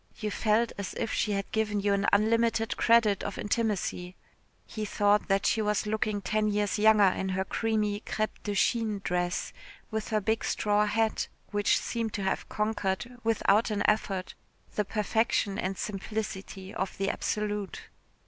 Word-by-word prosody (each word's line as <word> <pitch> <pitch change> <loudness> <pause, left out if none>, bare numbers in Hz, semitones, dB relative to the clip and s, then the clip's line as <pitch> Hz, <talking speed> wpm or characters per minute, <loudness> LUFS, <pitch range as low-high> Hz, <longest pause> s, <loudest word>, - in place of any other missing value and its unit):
You 215 -2 -2
felt 225 +3 +2
as 200 - -4
if 225 - -2
she 210 - 0
had 200 -1 -3
given 215 -2 0
you 200 0 +2
an 200 0 +1
unlimited 225 +2 +2
credit 225 -4 +4
of 200 - -4
intimacy. 205 -4 -1 0.5
He 215 - -5
thought 205 0 +2
that 195 -1 +1
she 220 - +2
was 210 -1 0
looking 210 -1 -1
ten 215 +2 +1
years 210 0 0
younger 215 -1 +6
in 190 0 +2
her 190 0 -1
creamy 215 -1 0
crêpe 215 0 -3
de 205 -1 -3
Chine 215 -1 +1
dress, 175 0 -1 0.4
with 220 -1 -2
her 215 - +1
big 220 +2 0
straw 210 0 +1
hat, 220 +1 0 0.2
which 205 -1 +3
seemed 230 -2 -3
to 200 - -2
have 190 - -2
conquered, 210 +2 -2
without 225 -1 +3
an 205 -1 0
effort, 195 -3 0 0.4
the 210 - 0
perfection 210 -1 0
and 190 +1 -2
simplicity 195 -1 -5
of 190 - -3
the 195 0 0
absolute. 210 -2 -3
210 Hz, 160 wpm, -29 LUFS, 200-220 Hz, 0.5 s, younger